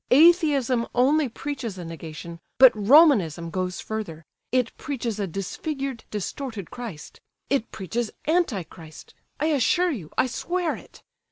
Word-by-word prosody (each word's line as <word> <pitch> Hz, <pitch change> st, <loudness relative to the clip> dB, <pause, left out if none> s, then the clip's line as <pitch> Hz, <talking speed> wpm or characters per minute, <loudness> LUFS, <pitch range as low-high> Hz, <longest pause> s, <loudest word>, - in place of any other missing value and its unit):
Atheism 280 Hz, -6 st, +4 dB
only 275 Hz, +3 st, +3 dB
preaches 245 Hz, -5 st, -5 dB
a 175 Hz, -, -7 dB
negation, 165 Hz, 0 st, -8 dB, 0.2 s
but 260 Hz, -1 st, +9 dB
Romanism 210 Hz, -, +4 dB
goes 185 Hz, 0 st, -2 dB
further; 170 Hz, -8 st, -5 dB, 0.3 s
it 250 Hz, -2 st, +1 dB
preaches 235 Hz, -7 st, -4 dB
a 200 Hz, -, -1 dB
disfigured, 265 Hz, -, -4 dB
distorted 210 Hz, -, -5 dB
Christ—it 235 Hz, -, -5 dB
preaches 220 Hz, +5 st, -3 dB, 0.2 s
Anti 310 Hz, -, +1 dB
Christ—I 160 Hz, -, -10 dB
assure 320 Hz, +5 st, +2 dB
you, 185 Hz, -, -6 dB
I -, -, +4 dB
swear 345 Hz, +8 st, -2 dB
it! -, -, -15 dB
235 Hz, 120 wpm, -25 LUFS, 185-285 Hz, 0.3 s, but